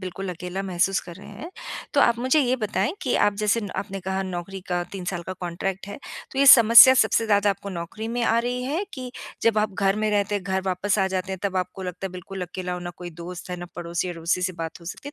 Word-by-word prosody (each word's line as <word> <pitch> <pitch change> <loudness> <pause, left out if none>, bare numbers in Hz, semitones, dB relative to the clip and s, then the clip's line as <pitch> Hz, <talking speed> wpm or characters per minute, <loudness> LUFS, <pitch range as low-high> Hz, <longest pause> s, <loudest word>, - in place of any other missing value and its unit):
बिल्कुल 185 +1 -6
अकेला 180 +2 -5
महसूस 190 0 +1
कर 175 - -11
रहे 195 - -13
हैं। 210 - -9 0.4
तो 285 - +5
आप 235 -3 +4
मुझे 260 +5 +3
ये 255 -1 +2
बताएँ 210 +1 -1
कि - - 0
आप 205 - +1
जैसे 210 +2 +2
न 205 -3 -5
आपने 195 -1 -4
कहा 190 +1 -2
नौकरी 185 +1 -5
का 175 -1 0
3 190 -2 -6
साल 175 - -4
का 185 - -5
कॉन्ट्रैक्ट 185 +2 -4
है 205 - -7 0.3
तो 270 - -4
ये 280 - +4
समस्या 235 0 +10
सबसे 230 -3 +3
ज़्यादा 205 -1 +3
आपको 200 0 -5
नौकरी 185 +5 -5
में 240 +1 -2
आ 225 - +3
रही 245 +1 -1
है 310 +9 -1
कि 255 -3 -6 0.3
जब 230 -2 +3
आप 210 -1 0
घर 195 +1 +1
में 215 0 0
रहते 205 0 +1
हैं, 200 - -1
घर 190 0 0
वापस 190 +2 0
आ 190 - +3
जाते 190 0 -3
हैं 190 - -4
तब 190 -2 -1
आपको 185 +1 -3
लगता 180 +1 -5
है - - -7
बिल्कुल 185 +1 -7
अकेला, 180 0 -4
ना 175 0 -6
कोई 175 +1 -9
दोस्त 175 +2 -9
है, 180 - -3
ना 175 - -7
पड़ोसी-अड़ोसी 170 0 -2
से 185 - 0
बात 165 0 -6
हो - - -14
सकती 180 +11 -7
है। 290 - -10
195 Hz, 255 wpm, -24 LUFS, 180-215 Hz, 0.4 s, समस्या